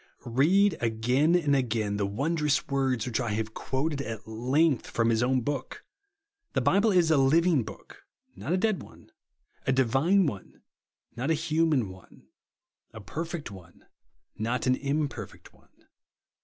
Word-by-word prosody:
Bead 185 +8 +4
again 125 +8 +2
and 150 -5 +2
again 110 -5 -1
the 100 -1 0
wondrous 150 +7 0
v/ords 135 -4 -1
which 125 -1 -2
I 120 -4 -1
have 110 +1 -3
quoted 140 +2 -2
at 110 -4 -6
length 130 +6 +1
from 115 0 +1
His 115 0 +1
o^vn 130 0 +1
book. 140 -3 -4 0.7
The - - +2
Bible 205 +3 +3
is 175 -4 +3
a 155 - +4
living 155 +3 +4
book, 105 -4 -11 0.3
not - - -5
a 185 - +3
dead 215 0 0
one; - - -16 0.6
a - - +4
divine 135 - +3
one, 105 - -6 0.5
not 125 +5 -2
a 160 - +3
human 155 -6 +1
one; 95 -1 -16 0.7
a 110 - -10
perfect 165 - -5
one, 90 -3 -14 0.5
not 120 +4 -1
an 130 - +4
imperfect 145 +2 -4
one. - - -28
135 Hz, 150 wpm, -28 LUFS, 115-160 Hz, 0.7 s, Bead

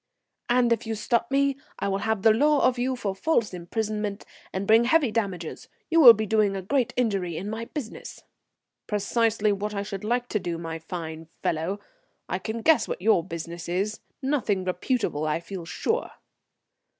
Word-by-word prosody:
"And 240 -1 +4
if 230 0 -4
you 225 - -1
stop 230 +2 0
me 275 0 +2 0.2
I - - -2
will 195 0 0
have 220 -2 -1
the 220 - +7
law 295 +5 +3
of 250 -1 0
you 255 +1 0
for 205 -6 -2
false 230 -1 0
imprisonment, 210 +3 -3 0.3
and 190 +1 -3
bring 225 +3 +5
heavy 280 -2 +3
damages. 195 -7 -3 0.2
You 330 0 +5
will 240 -5 +11
be 220 +1 -2
doing 215 -1 +2
me - - -3
a 190 - -5
great 255 +4 +1
injury 195 -9 0
in 200 +4 -4
my 225 +1 -4
business." 250 -4 -7 0.6
"Precisely 215 0 +1
what 205 +1 -3
I 200 - -1
should 200 -1 -6
like 240 +3 0
to 210 - 0
do, 175 -3 -3
my 165 -1 -5
fine 160 -1 -6 0.2
fellow. 170 +6 -1 0.5
I - - -2
can 225 0 -5
guess 320 -1 +4
what - - -3
your 215 -6 +4
business 170 0 -6
is. 200 +5 -1 0.2
Nothing 245 -9 0
reputable, 180 - -1
I 155 +2 0
feel 175 0 -7
sure." 160 - -1
210 Hz, 185 wpm, -26 LUFS, 185-235 Hz, 0.6 s, will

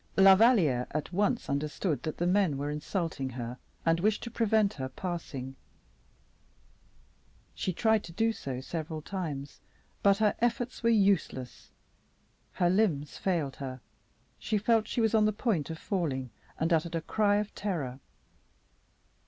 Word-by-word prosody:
La 195 0 +9
Valliere 190 - +4
at 155 +3 -4
once 205 +5 +1
understood 150 +3 -1
that 155 - -4
the 175 - 0
men 180 -5 +2
were 145 +1 -2
insulting 150 -2 -3
her, 120 0 -6 0.3
and 165 0 +3
wished 210 +3 +1
to 235 - -6
prevent 220 -3 +2
her 130 -2 -5
passing; 135 -5 -5 2.0
she 185 - -2
tried 220 +3 +2
to 170 - -9
do 225 +6 +1
so 130 - -5
several 155 +2 -5
times, 150 -7 -5 0.4
but 200 0 +5
her 215 -1 +3
efforts 240 +1 -1
were 230 - +3
useless. 195 - +1 0.8
Her 175 - +2
limbs 170 -8 +1
failed 165 -8 -1
her; 130 -2 -6 0.6
she 215 - 0
felt 220 +1 +2
she 240 - -1
was 220 -1 +2
on 215 -1 +5
the 215 - +3
point 205 - -1
of 160 - -5
falling, 140 - -2 0.3
and 165 +2 +2
uttered 165 +1 +1
a 165 - -1
cry 205 +4 +2
of 210 0 -1
terror. 150 -11 -3
175 Hz, 150 wpm, -30 LUFS, 145-210 Hz, 2.0 s, La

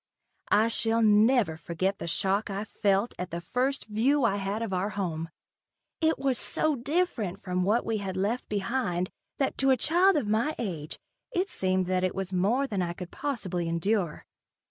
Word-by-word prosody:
I 215 +2 +4
shall 230 0 +2
never 215 -4 +4
forget 185 +4 -2
the - - -5
shock 195 +5 0
I 200 +1 -3
felt 200 +1 +1
at 180 0 -3
the 170 - -4
first 255 +10 -1
view 250 +7 +2
I 200 -4 +2
had 200 +3 -2
of 210 -4 -3
our 185 +2 0
new - - -10
home. 165 -5 -2 0.7
It 320 0 +3
was 270 -3 0
so 310 -1 0
different 240 - -1
from 180 -1 -1
what 210 +6 +2
we 225 -1 0
had 190 -2 -4
left 210 +6 -1
behind, 195 -3 -1 0.3
that 270 - -1
to 270 - +3
a 260 - +5
child 350 +8 +4
of 280 - 0
my 230 +9 +1
age, 165 -9 -4 0.3
it 380 -2 0
seemed 185 0 0
that 185 0 0
it 185 - 0
was 195 -1 -3
more 210 +10 +2
than 205 -8 -2
I 170 -1 -1
could 180 0 -8
possibly 195 - -3
endure. 170 0 -1
205 Hz, 190 wpm, -28 LUFS, 185-245 Hz, 0.7 s, a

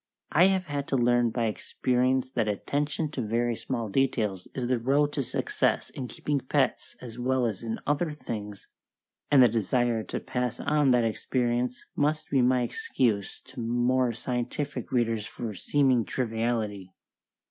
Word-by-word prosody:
I 170 +4 +6
have 190 -1 +3
had 145 -1 -3
to - - 0
learn 120 -1 +3
by 115 0 -1
experience 130 +4 0
that 110 - 0
attention 145 - -1
to 135 - -3
very 115 +2 0
small 120 -1 -3
details 105 -5 0
is 130 - -2
the 125 0 +1
road 145 +5 +2
to 145 - 0
success 125 - 0
in 130 - -5
keeping 145 +3 -2
pets 130 +1 0
as 120 -1 -8
well 130 0 +1
as 110 -5 -2
in 115 -1 -4
other 150 +3 +1
things, 110 -8 -6 0.6
and 135 -3 +7
the - - +8
desire 115 +1 +1
to - - -4
pass 125 -2 -3
on 150 -2 +2
that 125 -2 +4
experience 120 +2 -1
must 155 +1 0
be 135 -2 +4
my 125 0 +3
excuse 115 -3 -1
to 130 0 -12
more 120 +2 +1
scientific 125 +5 -3
readers 115 -4 0
for 115 -3 -5
seeming 130 +3 +2
triviality. 110 -5 -2
125 Hz, 160 wpm, -28 LUFS, 115-135 Hz, 0.6 s, the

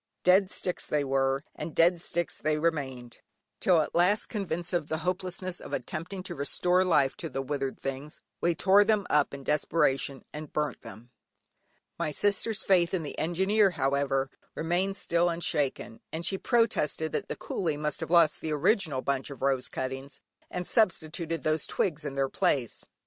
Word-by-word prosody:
Dead 185 +1 +5
sticks 180 -2 -2
they 150 -1 +1
were, 135 0 +1
and 155 +1 -7
dead 170 +1 +4
sticks 175 -1 -1
they 155 0 +1
remained, 135 -7 -2 0.4
till 175 -4 +4
at - - -4
last 180 +5 +2
convinced 175 -4 -3
of 170 -4 0
the 160 - -1
hopelessness 185 0 -3
of - - -9
attempting 180 +4 -4
to - - -6
restore 180 +6 +2
life 150 -7 +3
to 165 - -6
the 135 0 -3
withered 135 -1 -3
things, 135 +2 -5 0.2
we 170 -1 +2
tore 195 +4 +5
them 210 -2 +2
up 150 -1 +3
in 140 0 -8
desperation 140 -2 +1
and 150 0 -7
burnt 150 -5 -1
them. 120 +3 -12 0.9
My - - 0
sister's 205 +6 +1
faith 180 -2 +3
in 170 - -2
the 145 - -6
Engineer, 190 +5 +3
however, 135 -3 0 0.2
remained 180 +4 0
still 170 0 +2
unshaken, 145 -8 -1
and 165 +2 -2
she 190 - 0
protested 210 - +1
that - - -2
the - - -3
coolie 160 -6 -2
must 150 -1 -2
have - - -4
lost 170 -3 +4
the 155 - -2
original 155 - +1
bundle 140 0 -2
of - - -10
rose 135 -2 +1
cuttings, 135 +1 -5 0.3
and 180 0 -4
substituted 165 - 0
these 155 0 0
twigs 155 -5 -1
in 140 -1 -4
their 135 0 +1
place. 130 -2 -1
160 Hz, 170 wpm, -29 LUFS, 140-180 Hz, 0.9 s, Dead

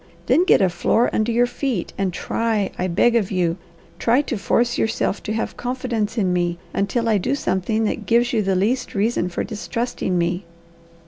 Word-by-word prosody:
"Then 350 - +4
get 280 - +5
a 190 - +4
floor 200 +7 +1
under 220 +2 +1
your 240 +1 +3
feet, 245 -6 -3
and 195 -2 -1
try, 215 +2 -1
I 185 - -1
beg 230 +7 +3
of 215 -5 +2
you, 175 -2 0 0.4
try 245 +5 +3
to 265 - -3
force 235 +3 +1
yourself 220 -2 0
to 215 - -3
have 225 - -3
confidence 245 -3 -2
in 190 -4 +1
me, 175 -1 0 0.2
until 230 +4 0
I 215 -3 +3
do 265 +9 0
something 215 -1 0
that 215 - -2
gives 240 +2 +3
you 225 - +2
the 195 -1 0
least 235 +7 0
reason 200 -3 +1
for 175 - -3
distrusting 220 -3 -3
me." 175 +2 0
220 Hz, 190 wpm, -21 LUFS, 185-240 Hz, 0.4 s, get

